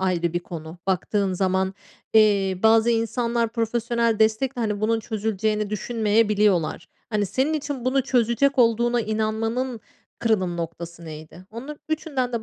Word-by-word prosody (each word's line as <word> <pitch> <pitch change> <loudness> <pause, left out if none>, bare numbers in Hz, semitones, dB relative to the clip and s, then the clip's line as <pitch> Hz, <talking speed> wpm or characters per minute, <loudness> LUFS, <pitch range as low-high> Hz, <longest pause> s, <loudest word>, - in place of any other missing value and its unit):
ayrı 175 -3 0
bir 175 - 0
konu 165 -1 -8
baktığın 190 +1 0
zaman. 190 +1 0 0.4
Eee, 200 -4 +4
bazı 225 +1 +5
insanlar 235 0 0
profesyonel 230 0 0
destekle, 220 +3 +1
hani, 210 -2 -1
bunun 225 +1 +1
çözüleceğini 215 -1 -1
düşünmeyebiliyorlar. 210 -4 +1 0.2
Hani, 210 -2 +1
senin 265 - 0
için 285 -4 -4
bunu 265 +1 +2
çözecek 255 +2 +2
olduğuna 235 +1 +3
inanmanın 225 +3 -2 0.4
kırılım 190 -6 +1
noktası 170 0 -6
neydi? 155 +3 -10
Onun 265 +7 -8
üçünden 290 -5 -2
de 230 -2 -2
220 Hz, 130 wpm, -24 LUFS, 190-235 Hz, 0.4 s, bazı